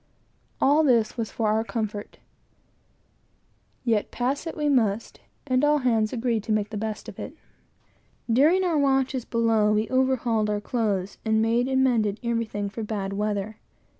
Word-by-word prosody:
All 295 +3 +4
this 235 -6 +2
was 225 -2 -3
for 220 -2 -1
our 220 +1 +1
comfort; 215 -3 -5 1.7
yet 225 -4 +1
pass 270 +6 -2
it 325 - -6
we 300 -1 0
must; 230 -6 0 0.3
and 255 -1 +1
all 295 0 +4
hands 230 -5 +1
agreed 235 -2 -1
to - - -3
make 215 0 0
the - - -5
best 215 0 -4
of - - -9
it. - - -7 0.9
During 300 +11 +4
our 335 -4 +1
watches 265 -2 +1
below 225 -2 +2
we 215 +1 +1
overhauled 250 -4 +1
our 210 0 0
clothes, 205 -4 -2
and 220 -1 +2
made 230 +3 +2
and 265 0 +2
mended 220 -5 +1
everything 230 -3 -2
for 210 +3 -6
bad 205 -3 -3
weather. 210 +1 -2
225 Hz, 160 wpm, -25 LUFS, 215-260 Hz, 1.7 s, All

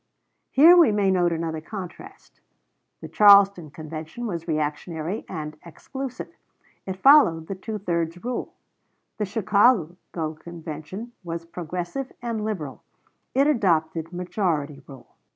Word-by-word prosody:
Here 320 +6 +7
we 335 -10 +6
may 205 -2 +2
note 175 -2 +2
another 160 -1 -3
contrast. 185 0 -10 0.6
The - - -7
Charleston 200 -5 +6
Convention 155 +8 -7
was 170 -6 -4
reactionary 155 +4 -3
and 155 -3 -6
exclusive; 260 - -7 0.5
it 190 - -2
followed 190 - +6
the 195 - -5
two 210 +3 -6
thirds 170 -3 -2
rule. 250 0 -4 0.6
The 210 - 0
Chicago 200 -3 +2 0.4
Convention 170 +6 -8
was 165 -1 -5
progressive 175 - -5
and 230 -3 -3
liberal; 185 -11 -4 0.5
it 275 +2 +4
adopted 165 - +1
majority 175 -5 -2
rule. 135 -3 -14
180 Hz, 115 wpm, -24 LUFS, 160-215 Hz, 0.6 s, Here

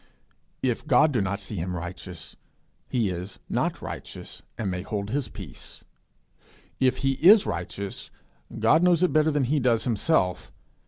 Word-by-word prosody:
If 130 +3 -1
God 150 +2 +5
do 120 -6 +1
not 100 +1 -1
see 100 +1 -6
him 90 +2 -3
righteous, 90 0 -8 0.5
he 115 -5 +1
is 90 +2 -6
not - - -1
righteous, - - -8 0.2
and 100 -4 -2
may 90 0 -3
hold 100 +1 -4
his 140 -2 -1
peace. 95 - -10 1.0
If 130 -1 +3
he 135 - +4
is 205 +4 +8
righteous, 95 +2 -5 0.5
God 115 +9 +4
knows 180 -1 +4
it 180 - +2
better 155 0 +4
than 145 -2 +1
he 145 +4 +1
does 120 -3 +2
himself. 110 - +1
110 Hz, 155 wpm, -26 LUFS, 95-145 Hz, 1.0 s, is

